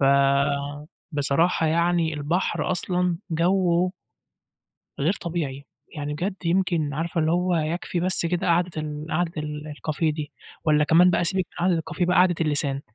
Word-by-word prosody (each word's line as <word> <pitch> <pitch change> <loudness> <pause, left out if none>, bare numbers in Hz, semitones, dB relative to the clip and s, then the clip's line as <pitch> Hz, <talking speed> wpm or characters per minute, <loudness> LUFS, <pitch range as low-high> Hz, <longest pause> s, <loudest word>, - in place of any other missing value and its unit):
فبصراحة 140 +3 +1
يعني 170 0 +1
البحر 165 +5 -1
أصلًا 180 -1 0
جَوّه 175 +1 +2 1.1
غير 155 +6 +2
طبيعي 150 -5 -4 0.3
يعني 145 0 -3
بجد 185 +6 -2
يمكن 170 -4 +1
عارفة 165 +2 -1
اللي 155 0 +1
هو 180 0 +1
يكفي 165 +2 -2
بس 180 -1 +1
كده 175 +2 -1
قعدة 175 +1 +2
ال 150 -1 -4
قعدة 170 +1 0
الكافيه 150 +1 -3
دي 150 -1 -6 0.3
والّا 150 -2 +4
كمان 175 +4 +5
بقى 175 - +1
سيبِك 185 0 +1
من 175 - -3
قعدة 180 -3 +3
الكافيه 175 +2 -2
بقى 180 - +2
قعدة 180 0 +5
اللسان. 145 -3 +1
165 Hz, 145 wpm, -24 LUFS, 150-175 Hz, 1.1 s, كمان